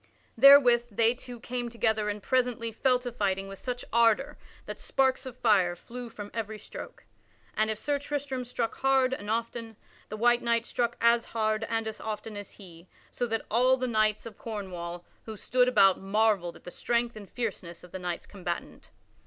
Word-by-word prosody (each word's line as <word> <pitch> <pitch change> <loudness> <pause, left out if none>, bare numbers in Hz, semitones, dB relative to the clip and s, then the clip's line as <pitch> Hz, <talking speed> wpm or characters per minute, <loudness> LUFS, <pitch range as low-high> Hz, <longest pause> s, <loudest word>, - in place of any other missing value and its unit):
Therewith 250 -4 +7
they 225 +2 +3
two 245 -1 -10
came 245 0 -4
together 220 -2 0
and 205 -1 -4
presently 250 -3 0
fell 255 +3 +2
to 245 0 -6
fighting 195 -4 -1
with 195 0 -9
such 250 -1 -4
ardor 235 +4 +3 0.3
that - - -7
sparks 265 0 +1
of 250 -1 -9
fire 195 -7 +3
flew 245 +6 -9
from 205 -2 -9
every 220 -1 -4
stroke. 210 - -10 0.5
And 220 0 +1
if 220 - -1
Sir 285 +5 -1
Tristram 280 -3 -3
struck 240 -2 -2
hard 265 -1 +3
and 205 -5 -5
often, 230 0 -3 0.3
the 215 - -5
white 240 +2 +3
knight 235 -1 +1
struck 240 -1 -1
as 235 0 +4
hard 215 -1 -1
and 225 -1 -2
as 220 - -6
often 215 0 -5
as 205 -1 -7
he, 175 -3 -14 0.2
so 245 - -2
that 225 -1 -2
all 255 +4 +4
the 255 - -2
knights 215 -3 +1
of 225 -3 -10
Cornwall 175 -5 -6 0.2
who 220 -1 -7
stood 250 +4 +2
about 195 -7 +5
marvelled 195 -3 +1
at - - -16
the 180 - -8
strength 235 +2 -1
and 205 -2 -10
fierceness 185 -8 -5
of 180 - -14
the 190 - -6
knights 175 -1 -4
combatant. 180 -4 -6
225 Hz, 185 wpm, -28 LUFS, 205-245 Hz, 0.5 s, Therewith